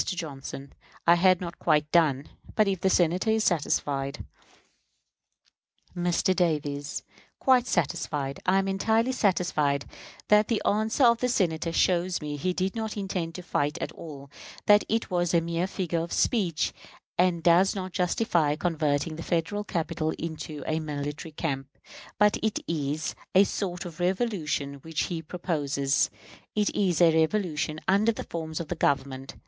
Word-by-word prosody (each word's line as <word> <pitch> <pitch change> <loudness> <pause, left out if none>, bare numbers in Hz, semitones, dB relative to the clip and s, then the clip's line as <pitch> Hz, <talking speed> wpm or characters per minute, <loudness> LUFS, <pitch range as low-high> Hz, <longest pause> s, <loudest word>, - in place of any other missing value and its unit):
Johnson: 140 -6 -6 0.3
I 170 - +7
had 185 +1 +4
not 175 -1 -6
quite 150 -2 +2
done; 150 -5 +3 0.3
but 215 -2 +4
if 190 -3 -1
the 190 - +3
Senator 180 +3 +2
is 220 0 +2
satisfied 145 -5 0 1.7
Mr. 175 +1 +1
Davis: 150 -4 -1 0.3
Quite 255 -2 +3
satisfied. 150 -4 -1
I 185 +1 +4
am 195 0 +1
entirely 220 +5 +1
satisfied 175 - +1 0.4
that 210 0 +5
the 230 - +1
answer 220 +5 +2
of 235 -1 +5
the 250 - 0
Senator 170 -7 0
shows 175 +1 +2
me 150 -1 -4
he 165 +6 -1
did 185 +3 -2
not 220 -1 -3
intend 185 -4 -3
to 180 - -7
fight 150 -2 -1
at - - -3
all; 140 -4 -10 0.3
that 210 0 +6
it 225 -2 -1
was 175 -1 +1
a - - +6
mere 170 +2 -1
figure 175 -4 -2
of 170 +1 -4
speech, 185 - +1 0.4
and 175 -2 +2
does 175 +4 +5
not 185 -1 -4
justify 175 -5 +1
converting 155 -2 -1
the - - -5
Federal 170 +5 -1
capital 165 -4 -2
into 155 -2 -6
a 160 0 0
military 150 +1 -5
camp. 140 -3 -4 0.4
But 210 0 +4
it 220 -1 0
is 150 -1 -2 0.2
a 190 - +8
sort 185 -3 -3
of 170 -2 -9
revolution 175 -7 -1
which 160 +1 -2
he 170 -2 -3
proposes; 145 -5 0 0.5
it 210 -1 +1
is 180 -5 +1
a 165 -2 +6
revolution 160 -2 0
under 200 +4 +4
the 215 - -6
forms 160 -2 -5
of 170 - -5
the - - 0
Government. 135 -3 -1
170 Hz, 155 wpm, -27 LUFS, 150-190 Hz, 1.7 s, a